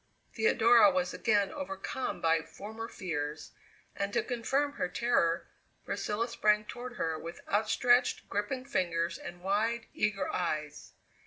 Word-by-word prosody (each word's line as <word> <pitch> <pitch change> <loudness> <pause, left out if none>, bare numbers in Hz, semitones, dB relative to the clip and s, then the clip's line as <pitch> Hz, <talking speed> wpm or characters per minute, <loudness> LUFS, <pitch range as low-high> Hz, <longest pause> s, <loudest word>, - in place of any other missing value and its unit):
Theodora 230 +4 +6
was 275 -1 0
again 205 -4 +2
overcome 285 -2 -4
by 165 0 +3
former 220 +7 -8
fears, 155 -7 -4 0.4
and 200 0 -2
to - - +2
confirm 270 +4 0
her 180 - -2
terror 180 -5 +1 0.4
Priscilla 220 +3 -1
sprang 210 -2 +2
toward 245 +2 -7
her 160 -9 -2
with 170 +1 -8
outstretched, 245 +4 +2
gripping 210 +6 -2
fingers 170 -9 -1
and 175 0 -9
wide, 225 +5 0
eager 205 -2 0
eyes. 155 -4 -3
210 Hz, 130 wpm, -31 LUFS, 175-245 Hz, 0.4 s, Theodora